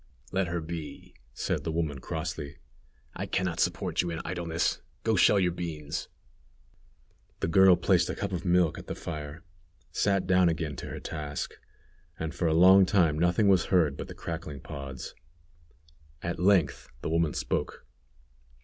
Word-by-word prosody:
"Let 95 Hz, -1 st, +1 dB
her 85 Hz, 0 st, -2 dB
be," 80 Hz, -1 st, -7 dB, 0.2 s
said -, -, -2 dB
the 80 Hz, -, -2 dB
woman, 80 Hz, -4 st, -2 dB
crossly. 80 Hz, -2 st, -5 dB, 0.6 s
"I -, -, -4 dB
can 95 Hz, -, 0 dB
not 85 Hz, -2 st, -2 dB
support 90 Hz, -1 st, +1 dB
you 90 Hz, -, -3 dB
in 85 Hz, -1 st, -3 dB
idleness. 85 Hz, -2 st, -1 dB, 0.2 s
Go 110 Hz, -1 st, +2 dB
shell 100 Hz, +1 st, +5 dB
your 90 Hz, -2 st, +2 dB
beans." 80 Hz, -4 st, -5 dB, 1.3 s
The -, -, -1 dB
girl 95 Hz, +2 st, +7 dB
placed 90 Hz, 0 st, +2 dB
a -, -, -2 dB
cup 100 Hz, -3 st, -3 dB
of 90 Hz, -2 st, -3 dB
milk 90 Hz, -3 st, +2 dB
at -, -, -12 dB
the -, -, -4 dB
fire, 75 Hz, 0 st, -6 dB, 0.5 s
sat 100 Hz, -2 st, +1 dB
down 90 Hz, -1 st, +4 dB
again 80 Hz, -3 st, -2 dB
to -, -, -6 dB
her -, -, -6 dB
task, 75 Hz, -2 st, -5 dB, 0.6 s
and, 80 Hz, -2 st, -4 dB
for 85 Hz, -, 0 dB
a 80 Hz, -, +2 dB
long 95 Hz, +3 st, +8 dB
time, 85 Hz, -6 st, +3 dB
nothing 90 Hz, +5 st, +3 dB
was 95 Hz, -4 st, +4 dB
heard 80 Hz, -7 st, +3 dB
but -, -, -6 dB
the -, -, -9 dB
crackling 80 Hz, -4 st, -6 dB
pods. 70 Hz, -3 st, -7 dB, 1.1 s
At 85 Hz, -, -3 dB
length 90 Hz, -5 st, +2 dB
the -, -, -3 dB
woman 80 Hz, -2 st, +1 dB
spoke. -, -, -3 dB
85 Hz, 165 wpm, -28 LUFS, 80-90 Hz, 1.3 s, long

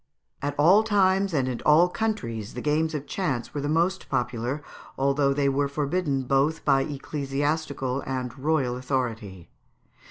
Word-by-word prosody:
] -, -, -45 dB
At -, -, -15 dB
all 175 Hz, +8 st, +6 dB
times 195 Hz, -2 st, +2 dB
and 135 Hz, -5 st, 0 dB
in 125 Hz, -2 st, -3 dB
all 155 Hz, +4 st, +6 dB
countries 120 Hz, -, -3 dB
the 125 Hz, -, -4 dB
games 155 Hz, +2 st, 0 dB
of 145 Hz, -1 st, -4 dB
chance 145 Hz, -12 st, -3 dB
were 145 Hz, -, -3 dB
the 145 Hz, -, -2 dB
most 170 Hz, +5 st, 0 dB
popular, 120 Hz, +4 st, -2 dB, 0.3 s
although 140 Hz, +1 st, +2 dB
they 140 Hz, 0 st, +1 dB
were 140 Hz, +1 st, +1 dB
forbidden 145 Hz, 0 st, -1 dB
both 140 Hz, +4 st, +1 dB
by 135 Hz, -2 st, +4 dB
ecclesiastical 140 Hz, -1 st, -2 dB
and 130 Hz, -2 st, -3 dB
royal 135 Hz, -4 st, 0 dB
authority. 115 Hz, -, -3 dB
140 Hz, 155 wpm, -26 LUFS, 130-160 Hz, 0.3 s, all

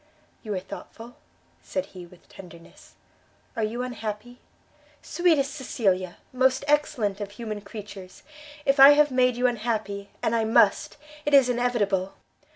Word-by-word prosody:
"You 210 Hz, -3 st, -4 dB
are -, -, -1 dB
thoughtful?" 230 Hz, +5 st, -11 dB, 0.4 s
said 280 Hz, -, -4 dB
he, 180 Hz, -2 st, -10 dB
with 180 Hz, 0 st, -20 dB
tenderness; 170 Hz, -3 st, -15 dB, 0.6 s
"are 225 Hz, -, -2 dB
you 235 Hz, +3 st, -2 dB
unhappy? 240 Hz, -1 st, -6 dB, 0.6 s
sweetest 320 Hz, -6 st, +1 dB
Cecilia! 195 Hz, -10 st, -1 dB, 0.2 s
most 260 Hz, +1 st, +2 dB
excellent 225 Hz, -9 st, 0 dB
of 205 Hz, -, -4 dB
human 215 Hz, -2 st, -6 dB
creatures! 200 Hz, -3 st, -11 dB, 0.4 s
if 275 Hz, 0 st, +2 dB
I 275 Hz, +2 st, +10 dB
have 295 Hz, -1 st, +3 dB
made 255 Hz, -1 st, +2 dB
you 250 Hz, -, 0 dB
unhappy 215 Hz, -4 st, -2 dB
and 225 Hz, -, +1 dB
I 225 Hz, -, +1 dB
must! 220 Hz, +1 st, +2 dB, 0.3 s
it 295 Hz, -1 st, +3 dB
is 265 Hz, -2 st, +6 dB
inevitable! 215 Hz, -6 st, 0 dB
230 Hz, 140 wpm, -25 LUFS, 200-255 Hz, 0.6 s, I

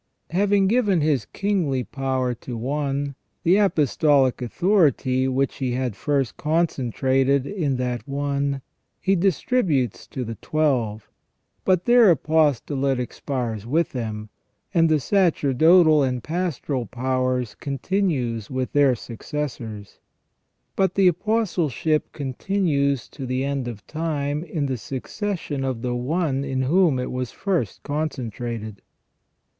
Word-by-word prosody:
Having 200 Hz, +2 st, +3 dB
given 205 Hz, -6 st, +2 dB
His 145 Hz, -6 st, +1 dB
kingly 175 Hz, -11 st, 0 dB
power 130 Hz, -2 st, -1 dB
to 120 Hz, 0 st, -7 dB
one, 140 Hz, +2 st, -2 dB, 0.3 s
the 180 Hz, +4 st, +5 dB
apostolic 145 Hz, -, +3 dB
authority 130 Hz, -, +2 dB
which 130 Hz, 0 st, 0 dB
He 130 Hz, -3 st, -1 dB
had 125 Hz, -4 st, -2 dB
first 140 Hz, 0 st, -1 dB
concentrated 135 Hz, -4 st, +1 dB
in 150 Hz, -6 st, -1 dB
that 125 Hz, +1 st, -3 dB
one 140 Hz, -1 st, -1 dB, 0.4 s
He 195 Hz, 0 st, +2 dB
distributes 175 Hz, -, +1 dB
to 130 Hz, -, -4 dB
the 115 Hz, -1 st, -5 dB
Twelve. 125 Hz, -9 st, 0 dB, 0.6 s
But 185 Hz, -2 st, +2 dB
their 240 Hz, -3 st, +6 dB
apostolate 145 Hz, -4 st, +2 dB
expires 120 Hz, -4 st, -4 dB
with 165 Hz, +7 st, +1 dB
them, 110 Hz, -4 st, -4 dB, 0.4 s
and 165 Hz, -2 st, +4 dB
the 155 Hz, -1 st, +3 dB
sacerdotal 160 Hz, -2 st, +4 dB
and 125 Hz, -3 st, -1 dB
pastoral 155 Hz, -7 st, -2 dB
power 130 Hz, 0 st, 0 dB
continues 140 Hz, -, -1 dB
with 130 Hz, -1 st, -3 dB
their 140 Hz, -3 st, +4 dB
successors. 115 Hz, -4 st, -6 dB, 0.8 s
But 190 Hz, -2 st, +1 dB
the 195 Hz, -2 st, +6 dB
apostleship 175 Hz, -, 0 dB
continues 140 Hz, -2 st, 0 dB
to 135 Hz, -3 st, -7 dB
the 130 Hz, +1 st, -1 dB
end 140 Hz, -2 st, -2 dB
of 110 Hz, -4 st, -7 dB
time 150 Hz, -2 st, -2 dB
in 155 Hz, -3 st, -2 dB
the 130 Hz, -2 st, -2 dB
succession 145 Hz, -, -4 dB
of 130 Hz, -4 st, -3 dB
the 125 Hz, -1 st, -1 dB
one 135 Hz, +2 st, -1 dB
in 135 Hz, -1 st, -1 dB
whom 165 Hz, 0 st, +3 dB
it 125 Hz, -, -3 dB
was 125 Hz, -1 st, -3 dB
first 175 Hz, -, -2 dB
concentrated. 120 Hz, -7 st, -4 dB
140 Hz, 120 wpm, -23 LUFS, 125-165 Hz, 0.8 s, their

